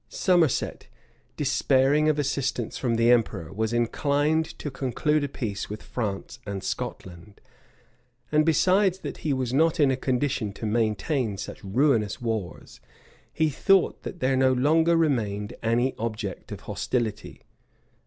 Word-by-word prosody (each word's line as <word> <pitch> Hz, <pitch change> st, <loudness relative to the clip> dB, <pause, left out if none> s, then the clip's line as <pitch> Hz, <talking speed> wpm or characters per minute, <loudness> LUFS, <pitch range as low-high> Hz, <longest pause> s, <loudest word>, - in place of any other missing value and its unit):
[] -, -, -41 dB, 0.2 s
Somerset, 175 Hz, -6 st, +2 dB, 0.5 s
despairing 140 Hz, +1 st, +2 dB
of 150 Hz, -, +1 dB
assistance 140 Hz, -4 st, -1 dB
from 120 Hz, -3 st, -1 dB
the 115 Hz, +1 st, +4 dB
emperor, 105 Hz, -9 st, +1 dB
was 110 Hz, +2 st, -1 dB
inclined 145 Hz, +6 st, 0 dB
to 145 Hz, -, -5 dB
conclude 140 Hz, +3 st, 0 dB
a 145 Hz, -, -2 dB
peace 105 Hz, -7 st, -4 dB
with 105 Hz, +1 st, -7 dB
France 105 Hz, -5 st, -4 dB
and 100 Hz, -2 st, -5 dB
Scotland; 95 Hz, +3 st, -6 dB, 0.9 s
and 155 Hz, 0 st, +4 dB
besides 185 Hz, +4 st, +3 dB
that -, -, -6 dB
he 155 Hz, -, -2 dB
was 130 Hz, -2 st, -1 dB
not 160 Hz, +4 st, +2 dB
in 140 Hz, -3 st, +4 dB
a -, -, +1 dB
condition 130 Hz, -4 st, -1 dB
to 110 Hz, -, -7 dB
maintain 110 Hz, +1 st, 0 dB
such -, -, -7 dB
ruinous 110 Hz, 0 st, +1 dB
wars, 110 Hz, -8 st, -5 dB, 0.5 s
he 160 Hz, -2 st, +1 dB
thought 195 Hz, +5 st, +2 dB
that 175 Hz, -, -8 dB
there 130 Hz, +1 st, +2 dB
no 130 Hz, 0 st, +3 dB
longer 160 Hz, +6 st, +3 dB
remained 110 Hz, -10 st, 0 dB
any 120 Hz, +3 st, +1 dB
object 110 Hz, -4 st, -4 dB
of -, -, -7 dB
hostility. 115 Hz, -4 st, -3 dB
130 Hz, 145 wpm, -26 LUFS, 110-150 Hz, 0.9 s, the